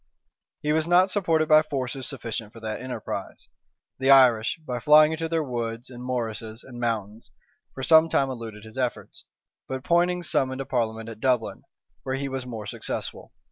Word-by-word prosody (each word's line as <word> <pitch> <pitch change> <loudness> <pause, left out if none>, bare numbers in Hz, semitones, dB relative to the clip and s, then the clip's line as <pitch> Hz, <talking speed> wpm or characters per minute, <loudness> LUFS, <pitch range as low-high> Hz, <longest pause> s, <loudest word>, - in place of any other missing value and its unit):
He 150 0 +1
was 160 +1 +1
not 180 +2 +4
supported 165 -6 +1
by 155 0 +7
forces 135 -3 -3
sufficient 110 -2 -5
for 115 - -11
that 110 -1 -5
enterprise: 130 -1 -6 0.5
the 135 0 +1
Irish, 125 -5 +6
by 125 -4 -3
flying 150 +4 +6
into 160 0 -3
their 165 -1 0
woods, 120 -1 -4
and 120 0 -9
morasses, 115 -2 -4
and 120 -2 -10
mountains, 110 -2 -3 0.5
for 135 - -6
some 160 +2 +6
time 135 -3 +1
eluded 115 -4 -8
his 110 +4 -9
efforts; 125 -2 -4 0.4
but 130 0 -5
Poynings 175 +1 +1
summoned 130 0 0
a 135 - -3
parliament 115 -4 -2
at 115 -2 -8
Dublin, 125 -2 0 0.4
where 130 +3 -3
he 140 +1 -3
was 130 -1 -4
more 110 -4 -6
successful. - - -6
130 Hz, 175 wpm, -25 LUFS, 115-150 Hz, 0.5 s, by